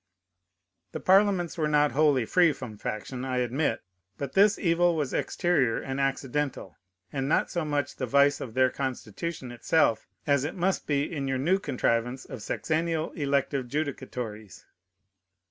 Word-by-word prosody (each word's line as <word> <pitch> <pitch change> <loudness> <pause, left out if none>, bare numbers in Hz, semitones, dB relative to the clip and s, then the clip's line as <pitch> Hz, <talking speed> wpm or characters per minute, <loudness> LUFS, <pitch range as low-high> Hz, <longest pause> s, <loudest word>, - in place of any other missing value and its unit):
The - - -3
parliaments 190 -3 +3
were 155 - +2
not 150 -1 +3
wholly 145 -5 +3
free 170 +5 +4
from 120 -6 -8
faction, 110 +5 -5
I 130 -1 -2
admit; 125 +1 0 0.3
but 140 -2 -5
this 205 +2 +5
evil 175 -1 +2
was 150 -5 -2
exterior 145 -10 +1
and 135 0 -4
accidental, 135 -5 -2 0.4
and 135 -1 -1
not - - +2
so 175 - -1
much 145 -3 -2
the 130 - -2
vice 140 +3 +4
of 115 -4 -7
their 130 -1 +4
constitution 130 - -4
itself 120 -2 +1 0.2
as 140 -2 +2
it 145 - -3
must 190 +1 0
be 140 -1 +1
in 145 -3 -3
your 135 -1 0
new 175 +9 +2
contrivance 125 -4 -1
of - - -8
sexennial 160 +5 -1
elective 140 -2 0
judicatories. 125 - -5
140 Hz, 150 wpm, -27 LUFS, 130-160 Hz, 0.4 s, this